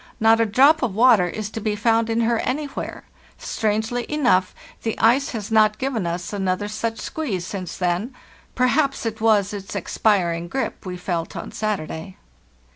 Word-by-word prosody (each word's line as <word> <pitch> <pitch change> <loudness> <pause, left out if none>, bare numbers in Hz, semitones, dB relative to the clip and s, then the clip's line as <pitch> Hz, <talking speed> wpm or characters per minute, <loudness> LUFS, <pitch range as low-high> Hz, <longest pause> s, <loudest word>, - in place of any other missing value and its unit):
Not 225 0 +5
a 225 - +2
drop 275 +9 +5
of 235 -7 -1
water 220 -5 +5
is 215 +3 -5
to 225 - -5
be 210 0 -1
found 225 +2 +2
in 225 +1 +1
her 230 0 +2
anywhere. 285 +2 -4 0.3
Strangely 220 +3 -2
enough, 245 -12 +2 0.3
the 225 - -2
ice 255 +5 +3
has 220 -2 -5
not 215 -1 +4
given 255 -9 -2
us 175 +3 -4
another 195 0 -1
such 225 +2 -3
squeeze 215 - -3
since 185 -3 -6
then; 180 +8 -1 0.4
perhaps 275 +1 +1
it 220 -1 -3
was 210 -3 +3
its 200 -1 -7
expiring 175 -5 +1
grip 265 -2 -4
we 180 0 -4
felt 175 -2 -3
on - - -6
Saturday. 190 -3 -4
215 Hz, 165 wpm, -22 LUFS, 190-235 Hz, 0.4 s, Not